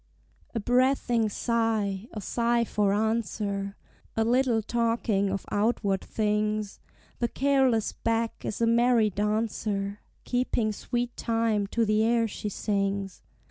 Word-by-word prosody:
A - - +1
breathing 245 -1 +2
sigh 220 -3 0
a 210 - -6
sigh 235 +3 +1
for 210 -3 +1
answer; 205 -2 -1 0.4
A 225 - +3
little 240 -2 +2
talking 230 -3 +1
of 195 0 -3
outward 205 -2 +1
things: 210 -1 -1 0.4
The 235 - +1
careless 265 -4 +2
beck 230 0 -2
is 215 - -4
a - - +4
merry 230 -1 +4
dancer, 210 -1 -1 0.2
Keeping 245 -3 0
sweet 240 +3 -3
time 225 -3 0
to 230 +3 +1
the 215 +1 +2
air 230 0 +2
she 210 0 -5
sings. 200 -1 -2
220 Hz, 125 wpm, -27 LUFS, 205-235 Hz, 0.4 s, a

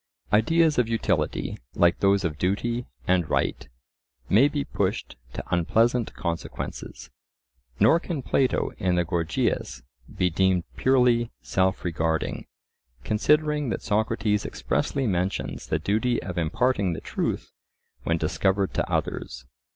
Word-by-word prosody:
Ideas 155 +7 +4
of 120 -2 +2
utility, 90 -9 -1 0.2
like 85 0 +3
those 100 0 +3
of 75 -4 -2
duty 115 +6 -1 0.2
and 90 -4 +2
right, - - -1 0.6
may 115 +8 +6
be 145 -1 -2
pushed - - -2 0.2
to - - -5
unpleasant 115 +7 +2
consequences. 85 -2 -5 0.7
Nor 110 +11 +5
can 165 -6 -4
Plato 130 0 +1
in 95 -4 +1
the 90 -1 +1
Gorgias 85 -5 -1 0.3
be 90 -1 0
deemed 95 0 +2
purely 125 -3 +3
self 95 0 0
regarding, 80 -1 -1 0.6
considering 150 - +2
that - - -3
Socrates 105 -1 0
expressly 65 - -1
mentions 95 -3 -2
the 80 - +1
duty 110 +9 0
of 90 - -5
imparting 95 +3 +1
the - - -5
truth - - -3 0.5
when 85 - 0
discovered 95 +5 0
to - - -1
others. 65 +1 -3
100 Hz, 125 wpm, -25 LUFS, 85-120 Hz, 0.7 s, may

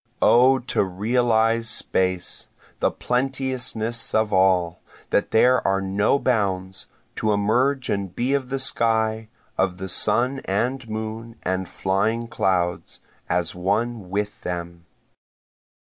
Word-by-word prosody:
O 130 +3 +6
to 130 -3 0
realize 115 +3 +1
space! 95 -1 -1 0.3
The - - +2
plenteousness 125 -3 -1
of 110 -1 +1
all, 90 -2 +2 0.3
that 100 - +1
there 125 +3 +4
are 95 0 +1
no 100 +6 +1
bounds, 95 -7 -1 0.3
To 110 - +1
emerge 125 +6 +1
and 100 -3 -2
be 125 +3 0
of 135 -3 -1
the 135 - -1
sky, 110 -4 0 0.3
of 95 -2 +1
the 95 +1 -5
sun 120 +9 +2
and 120 +5 -1
moon 110 +1 -5
and 95 0 -2
flying 105 +5 -1
clouds, 90 -5 -1 0.3
as 90 -2 0
one 100 +3 -1
with 105 +2 -3
them. 85 -1 -6
110 Hz, 120 wpm, -23 LUFS, 95-120 Hz, 0.3 s, O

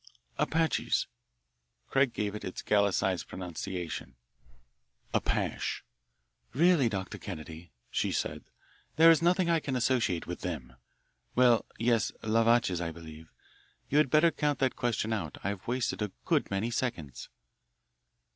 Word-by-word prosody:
"Apaches." 160 0 +1 0.8
Craig 135 -2 +2
gave 105 -2 -2
it 105 - -6
its 95 - -6
Gallicised 100 -2 +1
pronunciation, 90 -3 -5 1.0
"Apash." - - -1 0.7
"Really, 160 -4 +4
Dr. 95 -4 -4
Kennedy," 80 -2 -8 0.2
she - - 0
said, - - -2 0.5
"there 165 +2 +8
is 165 - +4
nothing 175 +1 +3
I 165 -1 +3
can 140 -4 -3
associate 120 -8 +1
with 90 - -5
them 70 -9 -5 0.6
well, 120 -2 +5
yes, 115 -2 +2
les 110 +1 +3
vaches, 115 -7 +3
I 85 - -2
believe. 80 -1 -11 0.6
You 145 - +4
had 150 - +3
better 155 +4 +5
count 150 -3 0
that 130 -1 +1
question 115 -2 -1
out. 85 -10 -4
I've 100 -1 -4
wasted 120 -5 -1
a 105 -2 -1
good - - +1
many 100 +4 -1
seconds." 90 - -3
110 Hz, 130 wpm, -30 LUFS, 90-130 Hz, 1.0 s, there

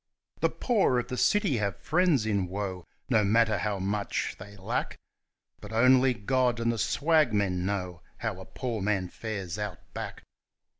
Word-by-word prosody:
The - - +3
poor 210 - +2
of 120 - -2
the 125 - -3
city 200 - +2
have 100 -4 -1
friends 155 -6 +2
in 100 -4 0
woe, 95 -2 -4 0.2
no 115 -4 +3
matter 110 +2 +3
how 105 -2 -1
much 100 +2 -2
they 100 +2 -11
lack, 95 - -3 0.6
But - - -10
only 125 +2 +5
God 125 +3 +1
and 115 0 +1
the 115 - -3
swagmen 105 - +2
know 90 -4 -3 0.2
how - - -3
a - - -9
poor 120 -5 -4
man 95 -2 0
fares 100 -5 -5
Out 105 -4 -3 0.2
Back. - - -6
105 Hz, 160 wpm, -28 LUFS, 100-125 Hz, 0.6 s, only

